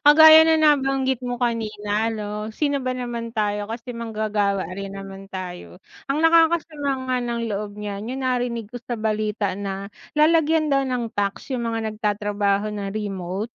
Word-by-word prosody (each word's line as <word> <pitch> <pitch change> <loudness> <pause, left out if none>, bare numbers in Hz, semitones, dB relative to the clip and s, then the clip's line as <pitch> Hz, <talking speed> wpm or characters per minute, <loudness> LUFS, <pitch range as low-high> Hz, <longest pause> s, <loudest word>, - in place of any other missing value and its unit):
kagaya 315 +1 +10
na 320 - +5
nabanggit 270 -4 +3
mo 245 - -1
kanina 215 -2 -1
'no 210 0 -4
sino 285 0 0
ba 255 0 -2
naman 240 -2 -4
tayo? 205 -1 -1
Kasi 230 +3 -6
manggagawa 215 -4 -1
rin 195 0 -5
naman 195 0 -8
tayo. 180 -1 -7 0.3
Ang 295 +3 0
nakakasama 325 -3 +3 0.2
nga 255 - +2
ng 235 -1 -2
loob 205 0 -4
niyan 205 0 -5
yung 270 - -4
narinig 245 -4 -1
ko 245 - -6
sa 240 - -4
balita 215 -2 -1
na 195 0 -4 0.3
lalagyan 315 0 +3
daw 275 0 +3
ng 245 -3 -2
tax 200 +5 -2
yung 240 -2 -1
mga 225 -1 -2
nagtatrabaho 205 -1 0
ng 205 -1 -4
remote. 195 -2 -3
225 Hz, 160 wpm, -23 LUFS, 205-260 Hz, 0.3 s, kagaya